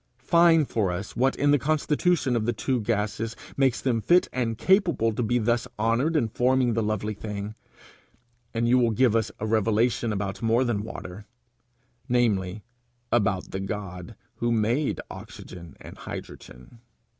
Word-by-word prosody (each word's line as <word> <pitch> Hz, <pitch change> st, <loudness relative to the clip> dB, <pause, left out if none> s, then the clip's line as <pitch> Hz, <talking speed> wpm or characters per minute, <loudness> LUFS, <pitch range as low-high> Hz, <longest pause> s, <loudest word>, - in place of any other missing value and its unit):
Find 165 Hz, +2 st, +4 dB
for 100 Hz, -5 st, 0 dB
us 95 Hz, +3 st, -5 dB
what 130 Hz, +3 st, +2 dB
in 145 Hz, 0 st, +2 dB
the 145 Hz, -, +4 dB
constitution 150 Hz, 0 st, +1 dB
of 110 Hz, -1 st, -1 dB
the 120 Hz, -, +1 dB
two 120 Hz, +3 st, -1 dB
gases 110 Hz, +1 st, -2 dB, 0.2 s
makes 135 Hz, -3 st, +2 dB
them 120 Hz, -4 st, 0 dB
fit 175 Hz, +9 st, +4 dB
and 115 Hz, -3 st, -1 dB
capable 170 Hz, -, +2 dB
to 115 Hz, -, -2 dB
be 120 Hz, +1 st, +1 dB
thus 120 Hz, +1 st, 0 dB
honoured 115 Hz, +9 st, +1 dB
in 125 Hz, -7 st, +2 dB
forming 125 Hz, +1 st, +2 dB
the 115 Hz, -, 0 dB
lovely 110 Hz, 0 st, -2 dB
thing, 105 Hz, 0 st, -6 dB, 1.0 s
and 115 Hz, +1 st, 0 dB
you 125 Hz, +2 st, +4 dB
will 120 Hz, -2 st, +3 dB
give 115 Hz, 0 st, +2 dB
us 110 Hz, -2 st, +1 dB
a 110 Hz, -, -3 dB
revelation 110 Hz, +1 st, +1 dB
about 100 Hz, -1 st, -3 dB
more 115 Hz, +2 st, +2 dB
than 120 Hz, -5 st, -1 dB
water, 105 Hz, -1 st, -8 dB, 0.8 s
namely 105 Hz, -5 st, +1 dB, 0.5 s
about 100 Hz, -5 st, +1 dB
the 95 Hz, -, -3 dB
God 95 Hz, 0 st, -6 dB, 0.2 s
who 120 Hz, 0 st, 0 dB
made 115 Hz, +6 st, +1 dB
oxygen 85 Hz, -4 st, -10 dB
and -, -, -12 dB
hydrogen. 65 Hz, -, -10 dB
115 Hz, 155 wpm, -26 LUFS, 105-125 Hz, 1.0 s, Find